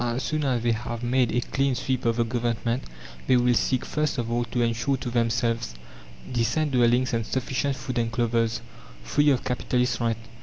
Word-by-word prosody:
As 120 Hz, +2 st, -1 dB
soon 155 Hz, -1 st, -1 dB
as 125 Hz, -4 st, 0 dB
they 120 Hz, -, +3 dB
have 115 Hz, +1 st, -4 dB
made 125 Hz, 0 st, +2 dB
a 120 Hz, -, +1 dB
clean 135 Hz, +1 st, 0 dB
sweep 130 Hz, 0 st, -2 dB
of 115 Hz, -1 st, +2 dB
the 120 Hz, -, +2 dB
Government, 120 Hz, +1 st, -1 dB, 0.4 s
they 130 Hz, -, +5 dB
will 125 Hz, 0 st, +3 dB
seek 120 Hz, +3 st, +1 dB
first 150 Hz, -1 st, -1 dB
of 115 Hz, -1 st, -2 dB
all 120 Hz, 0 st, +1 dB
to 120 Hz, +1 st, -1 dB
ensure 120 Hz, +4 st, 0 dB
to 125 Hz, -, -5 dB
themselves 115 Hz, -, 0 dB, 0.6 s
decent 120 Hz, +6 st, +1 dB
dwellings 125 Hz, 0 st, +3 dB
and 115 Hz, -1 st, +1 dB
sufficient 130 Hz, +3 st, -1 dB
food 125 Hz, -2 st, -3 dB
and 115 Hz, -1 st, 0 dB
clothes 115 Hz, -1 st, 0 dB, 0.4 s
free 145 Hz, -, +3 dB
of 130 Hz, -3 st, +2 dB
capitalist 125 Hz, -1 st, 0 dB
rent. 115 Hz, -2 st, 0 dB
120 Hz, 190 wpm, -26 LUFS, 115-130 Hz, 0.6 s, they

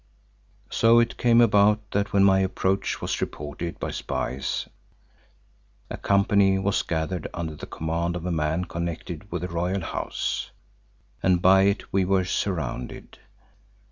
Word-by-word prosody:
So 115 Hz, +1 st, +5 dB
it 115 Hz, -, +1 dB
came 120 Hz, -1 st, +5 dB
about 105 Hz, -1 st, +3 dB
that 100 Hz, 0 st, 0 dB
when 100 Hz, -1 st, +4 dB
my 95 Hz, -1 st, +5 dB
approach 95 Hz, +1 st, -1 dB
was -, -, -2 dB
reported 75 Hz, +3 st, -5 dB
by -, -, -3 dB
spies, 65 Hz, +1 st, -3 dB, 1.2 s
a -, -, -4 dB
company 100 Hz, -1 st, +3 dB
was 95 Hz, +1 st, +1 dB
gathered 80 Hz, +1 st, -3 dB
under 80 Hz, -2 st, -4 dB
the -, -, -9 dB
command 85 Hz, +2 st, -2 dB
of 90 Hz, -1 st, -5 dB
a 90 Hz, -, -1 dB
man 80 Hz, +2 st, 0 dB
connected 85 Hz, +2 st, -5 dB
with 90 Hz, -1 st, -3 dB
the -, -, -1 dB
Royal 90 Hz, +3 st, -1 dB
House, 80 Hz, -, -3 dB, 0.7 s
and 90 Hz, -1 st, +3 dB
by 95 Hz, +2 st, +5 dB
it 100 Hz, +1 st, -1 dB
we 95 Hz, 0 st, +3 dB
were 95 Hz, 0 st, +2 dB
surrounded. 80 Hz, -10 st, -3 dB
95 Hz, 140 wpm, -25 LUFS, 85-100 Hz, 1.2 s, So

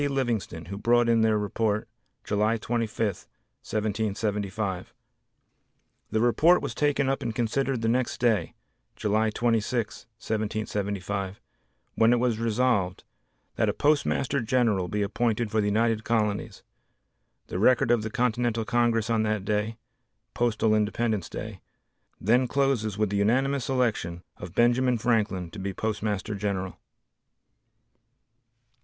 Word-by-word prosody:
Livingston, 120 Hz, -, -2 dB
who 100 Hz, +4 st, -6 dB
brought 120 Hz, +2 st, +3 dB
in 115 Hz, -1 st, +4 dB
their 110 Hz, -1 st, +3 dB
report 105 Hz, +1 st, -1 dB, 0.4 s
July 105 Hz, +2 st, +1 dB
25, 115 Hz, 0 st, -1 dB, 0.6 s
1775. 105 Hz, -2 st, -2 dB, 1.1 s
The 110 Hz, -, 0 dB
report 155 Hz, +10 st, +4 dB
was -, -, -3 dB
taken 145 Hz, -2 st, +1 dB
up 135 Hz, 0 st, 0 dB
and 115 Hz, -2 st, -3 dB
considered 120 Hz, +1 st, 0 dB
the -, -, +1 dB
next 125 Hz, +2 st, 0 dB
day, 110 Hz, -8 st, +1 dB, 0.4 s
July 110 Hz, +1 st, +1 dB
26, 115 Hz, +1 st, -1 dB
1775, 105 Hz, -3 st, -3 dB, 0.5 s
when 115 Hz, +1 st, +4 dB
it 120 Hz, -, +2 dB
was 120 Hz, -3 st, +1 dB
resolved, 115 Hz, -5 st, +1 dB, 0.5 s
that -, -, +2 dB
a -, -, 0 dB
Postmaster 145 Hz, -2 st, +1 dB
General 115 Hz, -6 st, +1 dB
be 105 Hz, +3 st, -1 dB
appointed 110 Hz, +1 st, -1 dB
for 110 Hz, -, +2 dB
the 105 Hz, -, 0 dB
United 110 Hz, +1 st, +1 dB
Colonies. 105 Hz, -3 st, -1 dB, 0.8 s
The 90 Hz, -, -4 dB
record 120 Hz, +2 st, +4 dB
of 120 Hz, -2 st, +3 dB
the 110 Hz, -, -4 dB
Continental 120 Hz, -1 st, 0 dB
Congress 115 Hz, -1 st, +1 dB
on 115 Hz, -2 st, +1 dB
that 110 Hz, -2 st, -1 dB
day 105 Hz, +2 st, -1 dB, 0.6 s
(postal 115 Hz, -2 st, +1 dB
independence 110 Hz, -2 st, 0 dB
day), -, -, -7 dB, 0.6 s
then 120 Hz, +5 st, +3 dB
closes 125 Hz, -7 st, 0 dB
with 105 Hz, -2 st, 0 dB
the 100 Hz, -, 0 dB
unanimous 130 Hz, +7 st, +1 dB
election 110 Hz, -10 st, -1 dB
of 90 Hz, -1 st, -9 dB
Benjamin 120 Hz, +1 st, +3 dB
Franklin 105 Hz, -7 st, 0 dB
to 105 Hz, -, -8 dB
be 95 Hz, 0 st, -4 dB
Postmaster 105 Hz, -1 st, -2 dB
General. 100 Hz, -2 st, -3 dB
110 Hz, 125 wpm, -27 LUFS, 105-120 Hz, 1.1 s, in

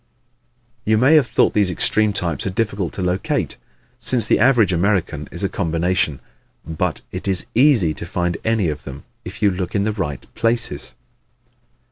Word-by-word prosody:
You 110 Hz, +1 st, +2 dB
may 130 Hz, +7 st, +5 dB
have 150 Hz, -5 st, +5 dB
thought -, -, +2 dB
these 100 Hz, -3 st, +2 dB
extreme 105 Hz, +4 st, +2 dB
types 85 Hz, -5 st, -2 dB
are -, -, 0 dB
difficult 100 Hz, -3 st, -2 dB
to 95 Hz, -, -4 dB
locate, 90 Hz, +1 st, -1 dB, 0.4 s
since 120 Hz, -4 st, 0 dB
the -, -, +3 dB
average 115 Hz, -6 st, +4 dB
American 85 Hz, -5 st, 0 dB
is -, -, -6 dB
a -, -, +2 dB
combination. 85 Hz, -3 st, 0 dB, 0.5 s
But 80 Hz, +1 st, -2 dB
it 90 Hz, -, -6 dB
is 95 Hz, -2 st, 0 dB
easy 120 Hz, -, +4 dB
to -, -, -7 dB
find 90 Hz, -1 st, -1 dB
any 110 Hz, -5 st, +1 dB
of 75 Hz, -3 st, -4 dB
them 70 Hz, 0 st, -9 dB, 0.2 s
if 100 Hz, +4 st, -8 dB
you 100 Hz, -, +5 dB
look 90 Hz, -1 st, -4 dB
in 100 Hz, -, +2 dB
the 110 Hz, +1 st, 0 dB
right 75 Hz, -, -4 dB
places. 115 Hz, -10 st, -2 dB
95 Hz, 170 wpm, -20 LUFS, 85-110 Hz, 0.5 s, may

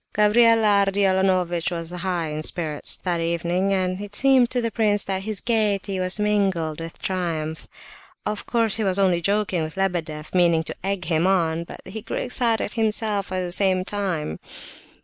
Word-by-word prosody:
Gavrila 215 Hz, -1 st, +4 dB
Ardalionovitch 190 Hz, -3 st, +1 dB
was 165 Hz, -1 st, -5 dB
in 180 Hz, -, -6 dB
high 170 Hz, -4 st, -2 dB
spirits 155 Hz, -2 st, -1 dB
that 175 Hz, -2 st, -1 dB
evening, 170 Hz, +3 st, 0 dB
and 185 Hz, 0 st, 0 dB
it 205 Hz, 0 st, -7 dB
seemed 265 Hz, -2 st, +4 dB
to 250 Hz, -, +1 dB
the 230 Hz, -1 st, -1 dB
prince 205 Hz, -2 st, +2 dB
that 190 Hz, -1 st, -3 dB
his 215 Hz, -3 st, -3 dB
gaiety 205 Hz, -4 st, 0 dB
was 185 Hz, +1 st, +1 dB
mingled 195 Hz, -7 st, 0 dB
with 165 Hz, 0 st, -8 dB
triumph. 165 Hz, -4 st, -3 dB, 0.6 s
Of 210 Hz, 0 st, -4 dB
course 230 Hz, -3 st, +2 dB
he 220 Hz, -, -1 dB
was 190 Hz, -2 st, +1 dB
only 185 Hz, -3 st, +2 dB
joking 200 Hz, -2 st, 0 dB
with 155 Hz, +3 st, -5 dB
Lebedeff, 165 Hz, -5 st, -2 dB
meaning 170 Hz, -3 st, +3 dB
to -, -, -6 dB
egg 195 Hz, -2 st, -2 dB
him 165 Hz, +1 st, +2 dB
on, 170 Hz, -3 st, +1 dB
but -, -, -11 dB
he 215 Hz, +3 st, -7 dB
grew -, -, -5 dB
excited 235 Hz, -4 st, 0 dB
himself 215 Hz, -3 st, 0 dB
at 185 Hz, 0 st, -1 dB
the 180 Hz, -1 st, -4 dB
same 185 Hz, 0 st, +3 dB
time. 185 Hz, -, -3 dB
190 Hz, 170 wpm, -23 LUFS, 170-210 Hz, 0.6 s, Gavrila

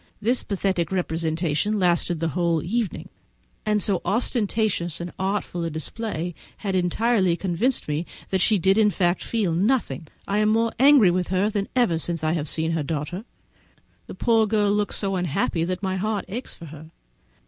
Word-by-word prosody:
This 235 Hz, +5 st, +2 dB
pathetic 190 Hz, -4 st, -1 dB
representation 165 Hz, +2 st, 0 dB
lasted 175 Hz, -2 st, +1 dB
the 165 Hz, 0 st, 0 dB
whole 170 Hz, -1 st, 0 dB
evening, 220 Hz, +3 st, -2 dB, 0.6 s
and 210 Hz, 0 st, +3 dB
so 195 Hz, -3 st, +2 dB
ostentatious 210 Hz, -, +1 dB
and 175 Hz, 0 st, -5 dB
artful 190 Hz, -2 st, -2 dB
a 165 Hz, -, -1 dB
display 175 Hz, +2 st, -4 dB, 0.2 s
has 200 Hz, -3 st, -3 dB
entirely 185 Hz, +1 st, +2 dB
convinced 200 Hz, +9 st, 0 dB
me 150 Hz, +3 st, -2 dB, 0.2 s
that 190 Hz, -1 st, +1 dB
she 215 Hz, -, +4 dB
did 190 Hz, +3 st, +3 dB
in 210 Hz, -1 st, +5 dB
fact 180 Hz, -2 st, 0 dB
feel 210 Hz, -7 st, 0 dB
nothing. 180 Hz, -, 0 dB, 0.2 s
I 205 Hz, +1 st, +1 dB
am 215 Hz, 0 st, +3 dB
more 225 Hz, +1 st, +2 dB
angry 270 Hz, -8 st, +7 dB
with 180 Hz, 0 st, -1 dB
her 190 Hz, +3 st, +1 dB
than 200 Hz, -2 st, -2 dB
ever 230 Hz, -10 st, +2 dB
since 165 Hz, -1 st, -3 dB
I 155 Hz, -, +2 dB
have 155 Hz, -3 st, -2 dB
seen 160 Hz, 0 st, 0 dB
her 165 Hz, -1 st, 0 dB
daughter; 155 Hz, +7 st, -4 dB, 0.8 s
the -, -, -8 dB
poor 225 Hz, -2 st, +3 dB
girl 205 Hz, -1 st, +2 dB
looks 210 Hz, 0 st, 0 dB
so 195 Hz, -1 st, 0 dB
unhappy 170 Hz, -1 st, 0 dB
that 185 Hz, +3 st, -3 dB
my 190 Hz, 0 st, -1 dB
heart 210 Hz, +1 st, -2 dB
aches 230 Hz, +7 st, -6 dB
for 165 Hz, -, -11 dB
her. 155 Hz, +1 st, -11 dB
190 Hz, 175 wpm, -24 LUFS, 170-215 Hz, 0.8 s, angry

